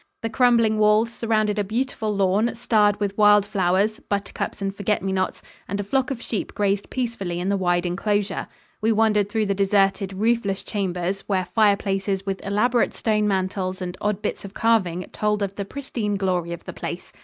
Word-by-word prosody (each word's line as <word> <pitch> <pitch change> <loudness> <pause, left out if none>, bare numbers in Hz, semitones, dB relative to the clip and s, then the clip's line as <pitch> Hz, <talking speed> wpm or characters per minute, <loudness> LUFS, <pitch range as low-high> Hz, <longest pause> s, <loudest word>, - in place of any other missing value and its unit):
The 225 - -2
crumbling 230 -3 +3
walls 215 +2 +3
surrounded 215 -2 0
a - - +2
beautiful 225 +1 -2
lawn, 200 +5 +2
starred 210 -3 +2
with 200 -1 -1
wild 210 -1 +6
flowers 195 +2 +1
buttercups 200 0 -3
and 195 -1 -2
forget 205 -1 -1
me 195 - -1
nots 185 0 -2 0.2
and 200 +2 -3
a - - -1
flock 255 +6 0
of 270 -4 -3
sheep 215 - -4
grazed 200 -1 0
peacefully 225 -9 -3
in 180 +2 -1
the 200 - +2
wide 175 -2 +1
enclosure. 205 +3 -1 0.3
We 220 +1 +2
wandered 210 -2 +2
through 220 0 0
the 200 - +1
deserted, 195 0 +2
roofless 205 -1 0
chambers 190 -2 -2
where 190 -2 0
fireplaces 195 0 +1
with 195 -1 -3
elaborate 230 +5 +1
stone 210 -2 +1
mantels 190 -1 -1
and 180 -1 -4
odd 210 0 -1
bits - - -3
of 200 0 -10
carving 190 -6 +1
told 210 -1 0
of 195 -1 -3
the 200 0 -4
pristine 230 -4 -3
glory 180 -3 -1
of 170 - -6
the - - -8
place. - - -6
205 Hz, 185 wpm, -23 LUFS, 195-215 Hz, 0.3 s, wild